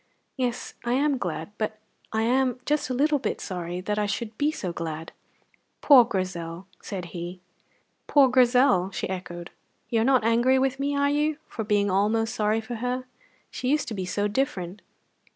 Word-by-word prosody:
Yes, 250 -2 -2
I 240 - 0
am 280 0 +2
glad, 170 -1 -4
but 215 0 -2 0.3
I 220 0 0
am 255 +1 +2
just 300 -2 0
a - - -1
little 290 +2 +2
bit - - -2
sorry 175 -1 -4
that 210 +3 -1
I 210 - +1
should 215 +2 -3
be 290 +5 +1
so 185 - -4
glad!" 165 -1 -5 0.7
"Poor 265 -5 +8
Grizel!" 185 -4 -4 0.2
said 185 -3 -5
he. 175 +1 -6 0.7
"Poor 280 -2 +6
Grizel!" 250 -6 +4
she - - -3
echoed. 175 -2 -6 0.4
"You 225 -2 +2
are - - +3
not 260 -1 +4
angry 240 +4 +4
with 265 0 +1
me, 285 +1 0
are 285 0 +2
you, 300 +1 +1
for 225 - -4
being 205 -2 +2
almost 220 +4 +1
sorry 215 -1 +1
for 230 +1 -6
her? 250 +2 -2 0.5
She 255 - -3
used 300 +1 +1
to - - -4
be 190 -3 -3
so 205 +3 0
different. 205 -6 -2
225 Hz, 180 wpm, -26 LUFS, 190-260 Hz, 0.7 s, Poor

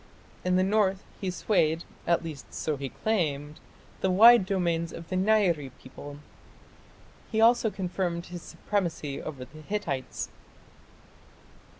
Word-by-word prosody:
In 180 0 +2
the 185 - +4
north 195 -1 +2 0.2
he 190 - -2
swayed 170 -4 +1 0.2
at 170 0 +2
least, 155 -4 -8
so 155 - -2
he 135 -1 -5
claimed 150 -9 -1 0.4
the 190 - +1
wide 220 +2 +7
domains 170 -4 0
of 170 - -9
the 185 - -2
Nairi 185 -7 +2
people. 145 +2 -10 1.1
He 220 - 0
also 230 0 +5
confirmed 180 -3 -3
his 175 -1 -8
supremacy 165 -10 -3
over 135 -5 -6
the 155 +4 -14
Hittites. 155 -8 -3
175 Hz, 125 wpm, -28 LUFS, 155-195 Hz, 1.1 s, wide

